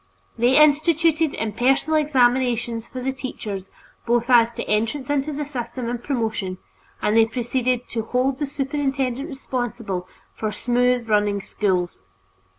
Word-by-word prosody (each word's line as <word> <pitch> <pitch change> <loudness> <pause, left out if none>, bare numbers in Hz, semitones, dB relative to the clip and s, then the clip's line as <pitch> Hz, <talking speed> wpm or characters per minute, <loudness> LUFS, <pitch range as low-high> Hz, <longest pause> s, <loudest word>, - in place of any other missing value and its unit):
They 245 +3 +3
instituted 315 +1 +4
impersonal 250 +8 +1
examinations 245 -5 +1
for 255 -1 -7
the 265 - 0
teachers 210 -7 -6 0.4
both 240 +1 +2
as 235 -1 +6
to - - -4
entrance 230 +6 -1
into 290 +1 0
the 295 0 -3
system 250 -3 -5
and 240 0 -4
promotion, 220 -8 -2 0.5
and 210 - +2
they 225 0 +6
proceeded 245 +1 -1
"to 230 - -2
hold 255 +4 0
the 290 - -1
superintendent 275 -1 -2
responsible" 240 - -4 0.3
for 215 -1 -3
smooth 245 +2 +1
running 205 -2 +1
schools. 180 -4 -1
245 Hz, 135 wpm, -23 LUFS, 225-275 Hz, 0.5 s, as